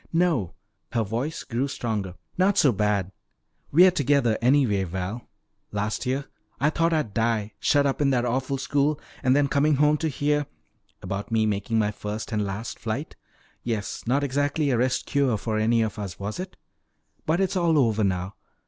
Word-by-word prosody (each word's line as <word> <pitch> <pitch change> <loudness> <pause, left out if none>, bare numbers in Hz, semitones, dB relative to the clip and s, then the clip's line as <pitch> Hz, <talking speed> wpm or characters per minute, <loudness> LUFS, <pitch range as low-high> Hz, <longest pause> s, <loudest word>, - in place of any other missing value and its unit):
"No," 165 - +1 0.4
her 115 - +2
voice 120 +9 -3
grew 125 +2 -1
stronger, 105 -9 -3 0.2
"not 190 +2 +2
so 140 - +5
bad. 100 -3 0 0.6
We're 180 +5 +7
together 140 -7 +2
anyway, 120 -6 +3
Val. 95 +6 -5 0.4
Last 105 +4 -2
year 135 +2 -1 0.3
I 150 +2 +2
thought 165 +1 +1
I'd 155 -10 0
die, 110 -1 0
shut 145 -1 +3
up 140 +1 0
in 140 - +3
that 125 -2 +1
awful 130 +3 -1
school, 140 +2 0 0.2
and 130 -1 +3
then 145 0 +3
coming 145 +2 +2
home 150 +2 +3
to 160 - -1
hear 145 0 0 0.3
" - - -42
"About 100 +3 -4
me 110 -1 +2
making 105 +2 -1
my 105 -1 +2
first 105 +2 -5
and 105 -1 0
last 105 +4 -5
flight. 115 +8 -4 0.5
Yes, 110 -4 -3
not 135 +4 +2
exactly 145 +2 0
a 125 - +2
rest 130 +1 +1
cure 135 -6 +1
for 110 +1 -2
any 115 +1 +3
of 110 -1 -4
us, 95 -5 -6
was 100 - -4
it? 185 0 -6 0.7
But 160 +3 +2
it's 195 0 0
all 170 -3 +3
over 110 -6 +2
now. 95 0 -1
125 Hz, 180 wpm, -25 LUFS, 105-145 Hz, 0.7 s, We're